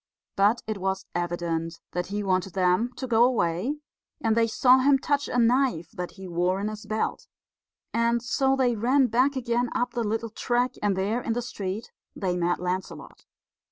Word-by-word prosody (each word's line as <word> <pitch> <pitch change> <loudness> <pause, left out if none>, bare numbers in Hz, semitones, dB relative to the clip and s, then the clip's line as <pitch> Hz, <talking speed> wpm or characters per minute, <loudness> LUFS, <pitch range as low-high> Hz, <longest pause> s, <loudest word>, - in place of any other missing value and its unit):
But 210 +4 +3
it 215 -2 -4
was 190 0 -2
evident 170 -1 -2
that 180 0 -2
he 205 +1 -3
wanted 185 -1 0
them 185 +5 +2
to 265 - -4
go 235 -2 +4
away, 235 - +1 0.4
and 225 -6 +1
they 230 0 +3
saw 255 +3 +5
him 275 +1 +5
touch 285 +1 0
a - - -2
knife 235 - +2
that 180 -1 -6
he 190 -2 -9
wore 180 +2 0
in 205 +2 -2
his 215 0 -8
belt; 215 0 -2 0.7
and 235 +1 +2
so 265 +2 +1
they 250 -3 +2
ran 255 +5 +3
back 255 +4 +2
again 240 -1 0
up 245 - 0
the 240 - -1
little 225 +1 -2
track, 245 +2 0
and 205 -2 +1
there 210 +6 0
in 230 - -1
the 245 - -1
street 205 -2 -5 0.2
they 185 -3 -1
met 175 0 0
Lancelot. 180 +1 -5
220 Hz, 185 wpm, -26 LUFS, 185-245 Hz, 0.7 s, saw